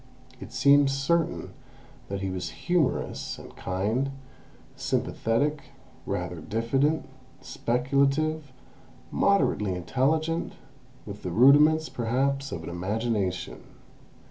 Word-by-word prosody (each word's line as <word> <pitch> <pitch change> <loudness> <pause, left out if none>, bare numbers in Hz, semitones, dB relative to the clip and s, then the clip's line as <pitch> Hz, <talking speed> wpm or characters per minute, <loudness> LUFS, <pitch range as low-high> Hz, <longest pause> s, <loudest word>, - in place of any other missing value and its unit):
It - - -9
seemed 140 +2 +5
certain 160 +5 0 0.6
that 100 0 -3
he 95 -1 -2
was 90 -1 -4
humourous, 175 -6 -1
and - - -12
kind, 105 +9 -1 0.7
sympathetic, 145 +6 -1 0.4
rather 90 -3 -3
diffident, 135 - 0 0.3
speculative, 140 +4 0 0.6
moderately 105 - +2
intelligent, 155 - 0 0.5
with 100 -1 -8
the 90 - -4
rudiments 150 - +6
perhaps 135 +3 -1
of 85 - -5
an - - -6
imagination. 95 0 -2
130 Hz, 90 wpm, -27 LUFS, 100-150 Hz, 0.7 s, rudiments